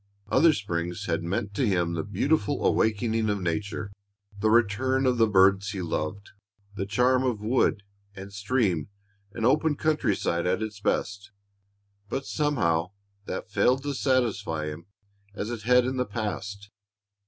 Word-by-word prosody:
Other 160 Hz, +5 st, +5 dB
springs 90 Hz, -, -3 dB
had -, -, -1 dB
meant 100 Hz, +4 st, -3 dB
to 120 Hz, +4 st, +1 dB
him 90 Hz, -4 st, +1 dB
the 85 Hz, -, -1 dB
beautiful 145 Hz, +8 st, 0 dB
awakening 110 Hz, 0 st, +1 dB
of 105 Hz, -1 st, 0 dB
nature, 100 Hz, +3 st, -3 dB, 0.5 s
the 110 Hz, +2 st, +2 dB
return 120 Hz, +4 st, +2 dB
of 125 Hz, -2 st, +2 dB
the 115 Hz, -, +5 dB
birds 100 Hz, 0 st, +4 dB
he 95 Hz, -2 st, -4 dB
loved, 85 Hz, +4 st, -4 dB, 0.4 s
the 95 Hz, -1 st, -4 dB
charm 125 Hz, +5 st, +3 dB
of 125 Hz, -5 st, 0 dB
wood 110 Hz, -1 st, +1 dB, 0.3 s
and 100 Hz, 0 st, -9 dB
stream 100 Hz, -, 0 dB, 0.4 s
and 115 Hz, +2 st, -3 dB
open 150 Hz, +4 st, +3 dB
country 155 Hz, -9 st, +1 dB
side 85 Hz, -1 st, -1 dB
at 95 Hz, +4 st, 0 dB
its 105 Hz, -1 st, -6 dB
best. 100 Hz, +1 st, -2 dB, 0.8 s
But 135 Hz, +4 st, -3 dB
somehow 95 Hz, -, 0 dB, 0.3 s
that -, -, -5 dB
failed 130 Hz, +2 st, +2 dB
to 145 Hz, 0 st, -2 dB
satisfy 110 Hz, -, 0 dB
him 80 Hz, +3 st, -9 dB, 0.5 s
as 105 Hz, +2 st, -4 dB
it 120 Hz, -3 st, -5 dB
had 125 Hz, +2 st, +4 dB
in 130 Hz, +1 st, -2 dB
the 125 Hz, -, 0 dB
past. 100 Hz, -1 st, -5 dB
105 Hz, 155 wpm, -27 LUFS, 95-125 Hz, 0.8 s, Other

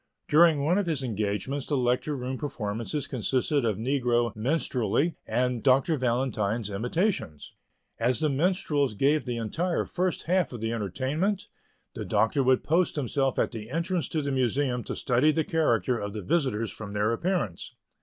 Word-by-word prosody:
During 155 Hz, -2 st, +5 dB
one 175 Hz, +6 st, +3 dB
of 200 Hz, -, -1 dB
his 150 Hz, -5 st, -1 dB
engagements 110 Hz, +4 st, -2 dB
the 145 Hz, -, 0 dB
Lecture 125 Hz, +4 st, 0 dB
Room 130 Hz, +1 st, -3 dB
performances 130 Hz, 0 st, -3 dB
consisted 135 Hz, +2 st, 0 dB
of 110 Hz, -4 st, 0 dB
negro 120 Hz, -2 st, +1 dB
minstrelsy 130 Hz, -, 0 dB
and 125 Hz, -1 st, 0 dB
Dr. 135 Hz, +4 st, +3 dB
Valentine's 120 Hz, -5 st, -1 dB
imitations. 120 Hz, -, -2 dB, 0.5 s
As 120 Hz, 0 st, +2 dB
the 155 Hz, -, +2 dB
minstrels 145 Hz, -, +1 dB
gave 140 Hz, +4 st, +2 dB
the 120 Hz, -2 st, -3 dB
entire 165 Hz, -, -1 dB
first 185 Hz, -1 st, -1 dB
half 180 Hz, +1 st, +1 dB
of 120 Hz, -, -6 dB
the 115 Hz, +1 st, -2 dB
entertainment, 135 Hz, -, -1 dB, 0.4 s
the -, -, -5 dB
Doctor 110 Hz, +5 st, +2 dB
would 130 Hz, -1 st, +3 dB
post 170 Hz, +3 st, +2 dB
himself 135 Hz, -1 st, 0 dB
at -, -, +1 dB
the 110 Hz, -2 st, -7 dB
entrance 170 Hz, +1 st, -1 dB
to 155 Hz, -2 st, -2 dB
the 140 Hz, -, -1 dB
Museum 130 Hz, -1 st, 0 dB
to -, -, -4 dB
study 130 Hz, +4 st, +3 dB
the 160 Hz, +1 st, 0 dB
character 125 Hz, -7 st, +1 dB
of 100 Hz, 0 st, -4 dB
the 105 Hz, -2 st, -5 dB
visitors 115 Hz, -, 0 dB
from 105 Hz, -2 st, -8 dB
their 105 Hz, +2 st, +1 dB
appearance. 145 Hz, -, -2 dB
130 Hz, 165 wpm, -27 LUFS, 115-155 Hz, 0.5 s, During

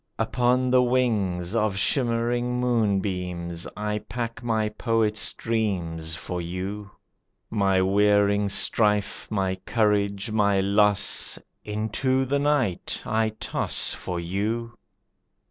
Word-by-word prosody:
"Upon 125 Hz, +3 st, +1 dB
the 130 Hz, 0 st, +5 dB
wings 105 Hz, -8 st, 0 dB
Of 105 Hz, -3 st, +1 dB
shimmering 120 Hz, +1 st, +1 dB
moonbeams 95 Hz, -7 st, -1 dB
I 105 Hz, 0 st, -2 dB
pack 115 Hz, +2 st, -5 dB
my 110 Hz, -3 st, 0 dB
poet's 110 Hz, -1 st, 0 dB
dreams 85 Hz, -8 st, -2 dB
For 90 Hz, 0 st, -5 dB
you. 95 Hz, +4 st, -5 dB, 0.6 s
My 95 Hz, -3 st, +2 dB
wearying 100 Hz, +1 st, +3 dB
strife, 105 Hz, 0 st, +1 dB
My 95 Hz, -3 st, -1 dB
courage, 100 Hz, -1 st, 0 dB
my 100 Hz, -2 st, +2 dB
loss, 100 Hz, +1 st, +3 dB, 0.3 s
Into 110 Hz, +5 st, -1 dB
the 140 Hz, +2 st, 0 dB
night 140 Hz, -10 st, 0 dB
I 110 Hz, 0 st, +1 dB
toss -, -, +1 dB
For 90 Hz, -1 st, -4 dB
you. 110 Hz, +7 st, -3 dB
105 Hz, 105 wpm, -25 LUFS, 95-115 Hz, 0.6 s, the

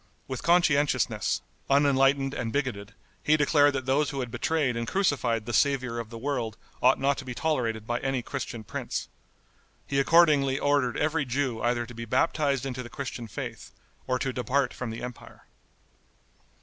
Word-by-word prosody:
With 130 Hz, -2 st, -4 dB
conscientiousness, 150 Hz, -, +2 dB, 0.3 s
unenlightened 135 Hz, -1 st, +3 dB
and 115 Hz, -2 st, -3 dB
bigoted, 115 Hz, -7 st, -3 dB, 0.3 s
he 155 Hz, +1 st, +3 dB
declared 145 Hz, -1 st, +4 dB
that 135 Hz, -2 st, -3 dB
those 140 Hz, +3 st, +2 dB
who 140 Hz, -, -4 dB
had 125 Hz, -2 st, -5 dB
betrayed 135 Hz, +1 st, 0 dB
and 115 Hz, 0 st, -3 dB
crucified 125 Hz, -, +1 dB
the 120 Hz, -, -4 dB
Saviour 130 Hz, -4 st, +1 dB
of 115 Hz, -2 st, -6 dB
the 115 Hz, -, -8 dB
world 120 Hz, -4 st, -3 dB, 0.2 s
ought 130 Hz, +2 st, +5 dB
not 140 Hz, +1 st, +1 dB
to -, -, -6 dB
be 125 Hz, -2 st, -6 dB
tolerated 115 Hz, -4 st, -1 dB
by 120 Hz, +1 st, -1 dB
any 135 Hz, -2 st, -1 dB
Christian 120 Hz, -4 st, -5 dB
prince. -, -, -4 dB, 0.8 s
He 140 Hz, -, 0 dB
accordingly 145 Hz, -3 st, +4 dB
ordered 145 Hz, -4 st, +1 dB
every 150 Hz, -1 st, +1 dB
Jew 125 Hz, -2 st, -1 dB
either 120 Hz, 0 st, 0 dB
to 120 Hz, -, -11 dB
be 115 Hz, 0 st, -6 dB
baptized 140 Hz, +2 st, +1 dB
into 130 Hz, -1 st, -4 dB
the 120 Hz, -, -9 dB
Christian 125 Hz, -4 st, -6 dB
faith 105 Hz, -, -7 dB, 0.3 s
or 130 Hz, -1 st, +1 dB
to 130 Hz, 0 st, -2 dB
depart 130 Hz, +3 st, 0 dB
from 125 Hz, -, -5 dB
the 115 Hz, +2 st, -6 dB
empire. 125 Hz, -1 st, -9 dB
130 Hz, 170 wpm, -27 LUFS, 120-145 Hz, 0.8 s, ought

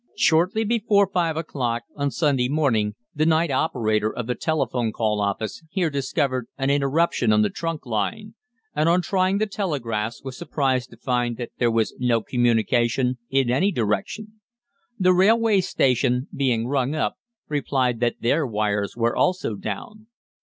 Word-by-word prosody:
"Shortly 180 Hz, +7 st, +3 dB
before 210 Hz, -2 st, +3 dB
five 165 Hz, -3 st, +1 dB
o'clock 125 Hz, -7 st, -2 dB
on 140 Hz, -1 st, -1 dB
Sunday 135 Hz, -2 st, +1 dB
morning 115 Hz, -9 st, +1 dB, 0.2 s
the 150 Hz, -, 0 dB
night 160 Hz, -1 st, +2 dB
operator 110 Hz, -7 st, 0 dB
of 125 Hz, -, -5 dB
the 125 Hz, -, -1 dB
telephone 125 Hz, -7 st, -1 dB
call 105 Hz, -2 st, 0 dB
office 100 Hz, +5 st, -2 dB
here 175 Hz, -3 st, 0 dB
discovered 135 Hz, -3 st, -1 dB
an 135 Hz, 0 st, +1 dB
interruption 140 Hz, -3 st, +2 dB
on 105 Hz, 0 st, +4 dB
the 105 Hz, -, 0 dB
trunk 165 Hz, -3 st, -4 dB
line, 170 Hz, -, -3 dB, 0.4 s
and 155 Hz, +2 st, +2 dB
on 175 Hz, +1 st, +3 dB
trying 185 Hz, +1 st, +1 dB
the 215 Hz, -, +1 dB
telegraphs 120 Hz, -, -3 dB
was 130 Hz, -1 st, -6 dB
surprised 135 Hz, -6 st, -1 dB
to 115 Hz, -, -15 dB
find 120 Hz, -1 st, -1 dB
that 120 Hz, -, -6 dB
there 120 Hz, -, +3 dB
was 115 Hz, -1 st, 0 dB
no 125 Hz, -2 st, +2 dB
communication 120 Hz, +1 st, +1 dB
in 135 Hz, -3 st, +2 dB
any 185 Hz, +11 st, +2 dB
direction. 125 Hz, -, -3 dB, 0.6 s
The 185 Hz, -2 st, +4 dB
railway 210 Hz, +2 st, +4 dB
station, 125 Hz, -4 st, +1 dB
being 125 Hz, -5 st, +1 dB
rung 135 Hz, +2 st, 0 dB
up, 155 Hz, -, -1 dB, 0.3 s
replied 130 Hz, -5 st, 0 dB
that 120 Hz, -1 st, -1 dB
their 140 Hz, +5 st, +1 dB
wires 105 Hz, -1 st, -1 dB
were 115 Hz, 0 st, +1 dB
also 180 Hz, -10 st, +1 dB
down. 110 Hz, -, -7 dB
130 Hz, 155 wpm, -23 LUFS, 115-165 Hz, 0.6 s, on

